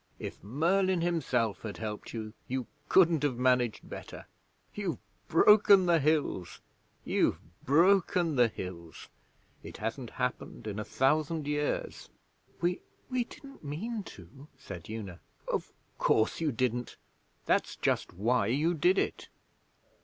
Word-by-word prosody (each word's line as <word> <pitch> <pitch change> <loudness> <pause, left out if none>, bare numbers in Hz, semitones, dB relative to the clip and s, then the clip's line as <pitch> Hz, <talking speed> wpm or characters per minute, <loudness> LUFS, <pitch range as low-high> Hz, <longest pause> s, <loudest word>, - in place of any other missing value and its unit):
If - - -7
Merlin 175 - +1
himself 130 - 0
had 110 -2 -6
helped 105 -1 -5
you, 110 -2 -6
you 130 -1 -2 0.2
couldn't 170 -5 +5
have 145 -5 0
managed 125 -2 +1
better! - - -9 0.5
You've 195 -6 -3 0.3
broken 200 +2 +6
the 170 -2 +4
Hills 145 - 0 0.5
you've - - +2 0.3
broken 175 +1 +3
the 120 -2 +5
Hills! 90 -6 -8 0.5
It - - -9
hasn't 115 +3 -4
happened 125 -3 -4
in 105 -1 -4
a - - -2
thousand 150 +5 +1
years.' 150 0 -2 0.5
'We 175 +1 0 0.3
we 250 -1 +1
didn't 275 - -13
mean 205 +11 -4
to,' 135 - -13
said 90 -10 -9
Una. 100 -6 -6 0.3
'Of - - -2 0.3
course 110 +8 +2
you 155 -3 +1
didn't! 125 0 -2 0.5
That's - - +1
just - - 0
why 110 +3 +1
you 150 +9 +2
did 175 +4 +3
it. - - -1
140 Hz, 130 wpm, -30 LUFS, 115-170 Hz, 0.5 s, broken